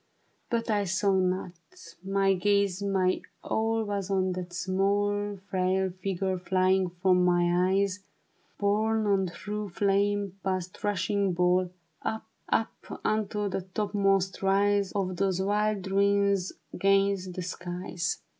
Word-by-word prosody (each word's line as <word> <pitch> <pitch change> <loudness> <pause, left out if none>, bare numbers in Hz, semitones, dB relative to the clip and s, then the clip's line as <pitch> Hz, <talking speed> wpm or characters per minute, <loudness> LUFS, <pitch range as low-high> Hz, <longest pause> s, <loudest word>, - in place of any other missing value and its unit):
But 230 -1 -1
I 205 -1 +1
saw 195 +2 +1
not; 185 -1 0 0.5
my 195 0 +2
gaze, 200 0 +1
my 190 -2 +1 0.2
all 225 0 0
Was 200 -2 -3
on 190 -1 +1
that 180 -1 -5
small 200 +3 0
Frail 190 0 +1
figure 185 0 -2
flying 185 0 +2
from 180 +1 +2
my 175 0 +3
eyes. 195 0 +1 0.6
Borne 215 +2 +1
on 195 -2 +2
through 210 +4 -5
flame, 200 +1 0
past 185 -1 -3
rushing 200 -1 0
ball, 180 +1 +2 0.3
Up, 220 0 -3 0.2
up, 225 - -2
unto 210 -1 0
the 195 0 -2
topmost 195 0 0
rise 200 0 +2
Of 185 -3 -2
those 190 -1 +1
wild 205 0 0
ruins 200 -1 +2 0.2
'gainst 195 -1 +2
the 180 - -4
skies. 180 0 -4
195 Hz, 125 wpm, -28 LUFS, 185-205 Hz, 0.6 s, my